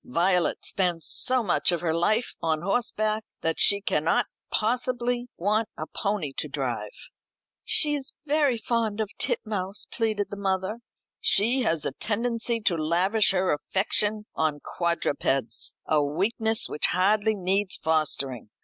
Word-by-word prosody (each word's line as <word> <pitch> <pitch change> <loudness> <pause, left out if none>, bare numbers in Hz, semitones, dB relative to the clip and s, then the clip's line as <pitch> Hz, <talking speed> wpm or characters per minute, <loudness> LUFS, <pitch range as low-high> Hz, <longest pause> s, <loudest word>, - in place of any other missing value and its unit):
Violet 175 +5 +1
spends 175 -4 0
so 255 -1 +1
much 185 - +2
of 175 - -1
her 165 -2 0
life 215 +8 +1
on 160 -1 0
horseback, 215 +1 0 0.2
that 165 0 -1
she 200 0 +4
cannot 160 -4 +2 0.2
possibly 245 +1 0
want 210 +5 +1
a 155 - -4
pony 195 -7 -2
to - - -2
drive." - - -4 0.5
"She 300 -2 +3
is 280 -2 -3
very 290 -4 +2
fond 225 -1 -1
of 215 -1 -2
Titmouse," 200 -2 -2
pleaded 215 -3 -1
the 205 - -5
mother. 195 +2 -1 0.4
"She 235 +6 +3
has 165 - 0
a - - 0
tendency 230 - -1
to 200 -5 +2
lavish 180 +7 +2
her 185 -1 +2
affection 210 +6 0
on 155 -2 0
quadrupeds 140 -8 -1
a 150 -2 +2
weakness 220 - +1
which 150 - 0
hardly 210 +4 +2
needs 190 +1 +2
fostering. 140 -7 -1
200 Hz, 140 wpm, -26 LUFS, 170-225 Hz, 0.5 s, she